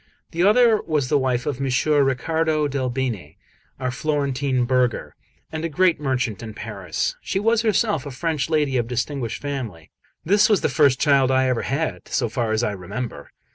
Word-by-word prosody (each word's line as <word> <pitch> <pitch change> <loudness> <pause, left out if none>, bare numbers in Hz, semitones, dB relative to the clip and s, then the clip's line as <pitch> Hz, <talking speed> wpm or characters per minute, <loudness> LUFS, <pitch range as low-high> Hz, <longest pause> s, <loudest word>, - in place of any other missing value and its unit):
The 170 - -2
other 220 +3 +5
was 150 -5 -1
the 145 - +3
wife 125 -2 0
of 145 -4 -2
M. 135 - -2
Ricciardo 150 +3 +1
del 135 -2 -2
Bene, 120 - -3 0.4
our 130 -1 -2
Florentine 135 -2 0
burgher, 125 -1 0 0.4
and 160 0 -4
a 165 - -1
great 170 +1 +2
merchant 130 -6 -1
in 110 -2 -8
Paris; 100 -8 -3
she 195 - -2
was 225 +2 +2
herself 210 - +1
a - - -4
French 155 +2 -2
lady 150 -4 +1
of 120 -2 0
distinguished 125 0 -3
family. 120 - -5 0.3
This 200 +6 +4
was 210 -4 +3
the - - +1
first 140 -4 +3
child 140 -3 +4
I 130 0 +3
ever 125 -2 0
had, 155 +4 -3
so 120 -4 -1
far 115 -1 -1
as 110 +2 +1
I 105 - 0
remember. 100 +6 -6
135 Hz, 180 wpm, -22 LUFS, 125-155 Hz, 0.4 s, other